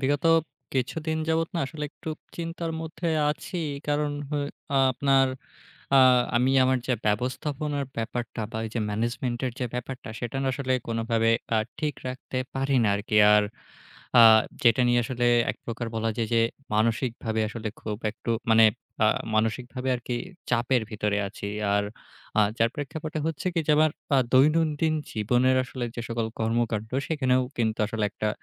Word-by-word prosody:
বিগত 145 +2 0 0.5
কিছুদিন 155 +5 -1
যাবৎ 165 0 +1
না - - 0
আসলে 150 +1 -6
একটু 160 - -10 0.3
চিন্তার 165 0 -4
মধ্যে 165 +1 -4 0.2
আছি। 175 +4 -5 0.3
কারণ 145 0 +1 0.2
হয় 145 -1 -1 0.4
আপনার 135 +1 +3 0.7
আ - - +8 0.4
আমি 125 +2 +3
আমার 130 0 +3
যা 130 - +2
ব্যবস্থাপনার 140 +6 -1
ব্যাপারটা 115 0 -3
বা 110 - -3
এই - - -8
যে 120 - 0
ম্যানেজমেন্টের 120 +3 -2
যে 125 - -1
ব্যাপারটা 125 +1 -5
সেটা 120 +1 -4
না 135 - 0
আসলে 130 0 -2 0.2
কোনোভাবে 115 0 +1 0.3
আ - - +4 0.2
ঠিক 150 -2 -1
রাখতে 130 0 -5 0.2
পারি 135 0 +1
না - - +3
আরকি। 105 +1 -2 0.2
আর 105 0 +5 0.8
আ - - +10 0.4
যেটা 120 +1 +5
নিয়ে 120 0 +4
আসলে 120 0 -1 0.2
একপ্রকার 115 0 -6
বলা 115 0 0
যায় 115 -2 -1
যে, 115 - +4 0.3
মানসিকভাবে 110 0 0
আসলে 110 0 -5
খুব 105 -1 -4
একটু 115 +2 -6 0.2
মানে 110 0 +7 0.4
আ - - +6 0.3
মানসিকভাবে 125 +4 -1
আরকি 120 0 -5 0.4
চাপের 120 +1 +2
ভিতরে 105 -1 -1
আছি। 100 0 -7 0.3
আর 105 0 +2 0.5
আ - - +7 0.2
যার 115 0 +3
প্রেক্ষাপটে 155 +2 -5
হচ্ছে 160 0 -3
কি 165 - +2
যে 150 - +4
আমার 155 0 +5 0.3
আ - - +5
দৈনন্দিন 155 +3 +3 0.2
জীবনের 125 +4 +2
আসলে 125 0 -5
যে - - -2
সকল 115 -1 -1
কর্মকান্ড 110 -1 0 0.2
সেখানেও 130 -5 +2 0.2
কিন্তু 110 -2 0
আসলে 110 0 -2
একটা 105 - -2
125 Hz, 155 wpm, -26 LUFS, 115-145 Hz, 0.8 s, আ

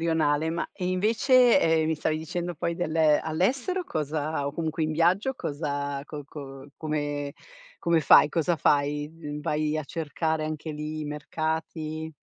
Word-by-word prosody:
rionale. 160 -2 +1
Ma 170 +1 -2
e 180 -2 -4
invece, 235 +7 +4
ehm, 160 -1 +3
mi 160 - 0
stavi 155 +1 0
dicendo 170 +3 -4
poi 170 +1 -2
del 165 -3 -2 0.2
all'estero 250 - 0
cosa 155 - -2
o 140 - -2
comunque 160 0 -2
in 155 - -1
viaggio 185 +11 +2
cosa 145 - -3
co 150 0 -7
co 135 -1 -10
come 145 -2 -2 0.5
come 170 -1 +3
fai? 150 0 +7
Cosa 170 +2 +1
fai? 145 -1 +1 0.3
Vai 150 +1 0
a 155 - -1
cercare 160 +1 -2
anche 155 0 -4
lì 150 +1 -5
i - - -3
mercati? 155 +1 -3
155 Hz, 150 wpm, -27 LUFS, 150-170 Hz, 0.5 s, fai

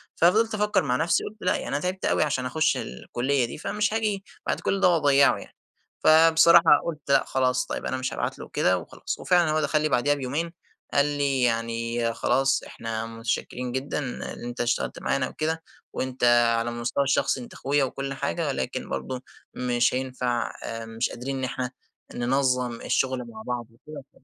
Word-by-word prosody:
ففضلت 220 +7 +3
أفكّر 210 -3 +2
مع 125 -4 0
نفْسي، 165 +5 +1
قُلت 215 - -7
لأ 180 - +2
يعني - - -4
أنا - - -1
تعبت 180 +4 -3
أوي - - +3
عشان 135 -4 -1
أخش 155 +5 +1
الكلية 125 - -1
دي 120 - -7
فمش 210 +6 -1
هاجي 210 -3 -1 0.2
بعد - - 0
كلّ 195 - 0
ده 190 - +6
وأضيّعه 145 -4 +4
يعني، - - -12 0.4
فبصراحة 165 0 +6
قُلت 165 -3 -3
لأ 140 - +4
خلاص 125 -1 +1
طيب - - -5
أنا 130 - -1
مش 130 0 -3
هابعت - - -3
له - - -9
كده 90 - +3
وخلاص، 85 - -6
وفعلًا 175 -3 +3
هو 155 0 +1
دخل 155 +1 +1
لي 155 - +1
بعديها 145 +2 +2
بيومين، 145 +5 -3 0.4
قال 140 - +4
لي 140 -2 0
يعني 115 0 0
خلاص 135 +3 +1
إحنا 115 -1 -5
متشكرين 115 +2 -3
جدًا 130 +3 -3
إن 135 -4 -5 0.2
أنت 120 +1 -4
اشتغلت 120 0 -1
معانا 135 -2 0
وكده، 160 +1 -2 0.3
وأنت 130 -1 -4 0.4
على 115 +1 -1
المستوى 120 +3 -1
الشخصي 135 -1 +1
أنت 120 - -10
أخويا 140 +1 +1
وكلّ 135 +1 -3
حاجة 140 +4 -2
ولكن 130 -2 -3
برضه، 130 -1 -4 0.3
مش 120 -1 +1
هينفع 125 -2 -1
آآ 115 0 -5
مش 115 +1 -2
قادرين 135 +3 -5
إن 130 - -4
إحنا 125 0 -3 0.4
ننظّم 125 -1 0
الشغل 130 -1 0
مع 110 -2 -10
بعض 120 -2 -3
وكده. 140 +3 -13
130 Hz, 180 wpm, -26 LUFS, 120-155 Hz, 0.4 s, ده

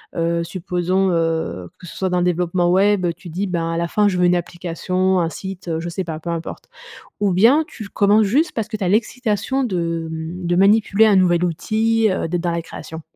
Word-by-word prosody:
Heu, 170 0 0
heu - - -1
supposons, 180 +2 -1
heu, 165 - -1
que 180 - -12
ce - - -10
soit 190 -1 -1
dans 180 - 0
le - - +1
développement 175 0 +1
web, 195 0 +3
tu 180 -1 -12
dis: 185 +5 -2
«Ben, 165 -2 -2
à - - -2
la 170 0 -1
fin 210 +3 +2
je 185 -2 0
veux 180 - +3
une 175 0 +4
application, 180 +2 -1
un 165 -1 0
site». 190 0 -8
Heu, 160 -1 -1
je 170 - -5
sais 190 +2 -3
pas, 160 -2 -5
peu 170 +1 -5
importe. 165 0 -6 0.5
Ou 205 -2 +1
bien 235 - +5
tu 215 -10 -9
commences 210 +2 +3
juste 290 - +1
parce 225 -3 -2
que 215 - -4
tu 200 - -4
as 180 - +1
l'excitation 235 +4 0
de, 170 -6 -2
mmh 165 +2 -5
de 175 - +1
manipuler 205 +2 +4
un 210 -2 +4
nouvel 180 -2 +3
outil, 220 +6 +1
heu, 185 - -1
d'être 175 +1 -2
dans 175 - -1
la 170 - -2
création? 160 0 -9
180 Hz, 235 wpm, -20 LUFS, 170-205 Hz, 0.5 s, bien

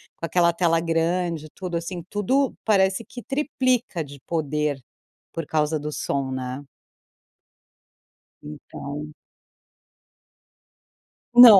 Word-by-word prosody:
com - - -4
aquela 170 0 +4
tela 165 -1 +3
grande. 165 -1 0
Tudo 180 -3 -3
assim, 170 +1 -4
tudo 255 +7 +2
parece 195 0 +3
que 245 - -8
triplica 255 - 0
de 140 -1 -11
poder 150 -3 -1 0.5
por 165 - -4
causa 155 0 +1
do 150 +1 -4
som, 140 -2 -1
né. 130 +1 -3 1.8
Então 150 0 -7 2.2
Não. 240 -4 +12
165 Hz, 100 wpm, -25 LUFS, 150-195 Hz, 2.2 s, Não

